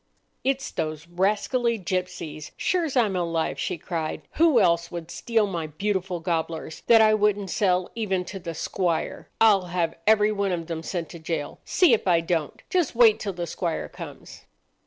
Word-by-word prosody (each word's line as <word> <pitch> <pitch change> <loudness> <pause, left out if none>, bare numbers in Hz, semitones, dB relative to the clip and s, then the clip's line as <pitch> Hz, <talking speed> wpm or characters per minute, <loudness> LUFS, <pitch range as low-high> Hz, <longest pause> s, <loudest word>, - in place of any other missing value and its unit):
"It's 270 0 -1
those 155 0 -4
rascally 210 +7 +1
gipsies, 180 -5 -4
sure's 330 -7 0
I'm 215 -6 +3
alive," 170 -2 -1
she - - -2
cried. 160 -1 -4
"Who 315 -6 +4
else 170 -3 +2
would 170 -1 -7
steal 225 -3 +1
my 170 -5 -3
beautiful 185 +2 -2
gobblers, 165 -2 -3
that 230 -1 +7
I 215 0 +6
wouldn't 205 -3 +1
sell 185 -3 +1
even 195 -5 -1
to 195 - -7
the 170 -2 -6
squire? 170 0 -2
I'll 205 -4 +5
have 175 -2 -1
every 215 -1 +5
one 200 -2 0
of 165 -2 -3
them 165 -1 -4
sent 170 0 -4
to 170 - -9
jail, 160 -2 -4
see 355 -9 +4
if 215 - +1
I 170 -2 +5
don't. 165 -3 -2
Just 355 -9 0
wait 230 -3 +6
till 200 -2 -3
the 175 -1 -4
squire 170 -1 -3
comes!" - - -10
185 Hz, 175 wpm, -25 LUFS, 165-215 Hz, -, that